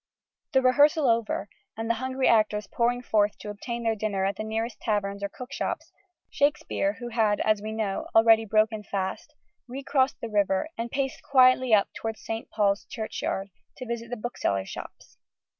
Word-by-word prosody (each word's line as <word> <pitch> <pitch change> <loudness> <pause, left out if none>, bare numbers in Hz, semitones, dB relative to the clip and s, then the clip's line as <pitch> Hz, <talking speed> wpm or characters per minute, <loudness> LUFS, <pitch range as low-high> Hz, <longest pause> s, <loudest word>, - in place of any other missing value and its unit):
The 265 -1 +4
rehearsal 290 +3 +5
over, 230 -3 +1 0.3
and 225 0 -3
the 230 - +3
hungry 260 0 0
actors 215 -2 +3
pouring 245 +1 0
forth 210 -3 +2
to 210 - -7
obtain 235 +3 -5
their 225 -1 +2
dinner 205 -3 -1
at 195 - 0
the - - -4
nearest 220 +1 -3
taverns 200 -2 -1
or 200 - -2
cookshops, 250 +6 -5 0.4
Shakespeare 295 +1 +1
(who 240 -4 -7
had, 220 -3 +1
as 215 -1 +2
we 215 +1 -5
know, 215 -3 -2
already 225 0 +6
broken 215 +1 +2
fast) 200 +9 -4 0.3
re 265 +3 -6
crossed 270 -1 +1
the 230 - -4
river 200 +1 +1
and 230 +1 -4
paced 270 +1 -2
quietly 255 -2 +4
up 210 -2 +5
towards 225 -1 -5
St. 225 0 -4
Paul's 200 -2 +1
Churchyard, 200 -3 -4 0.3
to 255 - -6
visit 235 -1 -5
the 245 - -4
booksellers' 100 - -2
shops. - - -10
225 Hz, 175 wpm, -27 LUFS, 210-250 Hz, 0.4 s, already